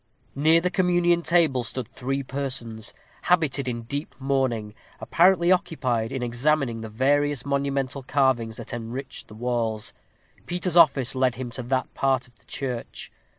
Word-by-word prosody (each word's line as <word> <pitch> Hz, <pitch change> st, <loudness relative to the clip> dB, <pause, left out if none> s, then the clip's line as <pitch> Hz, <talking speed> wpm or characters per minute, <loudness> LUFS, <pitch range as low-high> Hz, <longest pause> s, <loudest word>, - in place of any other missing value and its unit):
Near 160 Hz, +4 st, +4 dB
the 180 Hz, +1 st, 0 dB
communion 175 Hz, -2 st, +2 dB
table 165 Hz, -8 st, +3 dB
stood 125 Hz, -1 st, -4 dB
three 135 Hz, +3 st, -3 dB
persons, 130 Hz, -5 st, -4 dB, 0.3 s
habited 155 Hz, -6 st, +2 dB
in 120 Hz, -2 st, -3 dB
deep 140 Hz, +6 st, -5 dB
mourning, 130 Hz, -6 st, -1 dB, 0.3 s
apparently 175 Hz, 0 st, +4 dB
occupied 125 Hz, -11 st, 0 dB
in 130 Hz, -2 st, -3 dB
examining 120 Hz, 0 st, 0 dB
the 110 Hz, -, -6 dB
various 145 Hz, +4 st, +1 dB
monumental 140 Hz, -1 st, -1 dB
carvings 130 Hz, -4 st, +1 dB
that -, -, -8 dB
enriched 120 Hz, +3 st, -6 dB
the 105 Hz, -, -13 dB
walls. 115 Hz, -2 st, -2 dB, 0.5 s
Peter's 175 Hz, 0 st, -1 dB
office 140 Hz, -6 st, +5 dB
led 130 Hz, -2 st, +1 dB
him 125 Hz, 0 st, -5 dB
to 130 Hz, -, -4 dB
that 130 Hz, +1 st, -2 dB
part 135 Hz, -2 st, +1 dB
of 125 Hz, -, -24 dB
the -, -, -25 dB
church. 125 Hz, -4 st, -5 dB
135 Hz, 150 wpm, -25 LUFS, 120-145 Hz, 0.5 s, office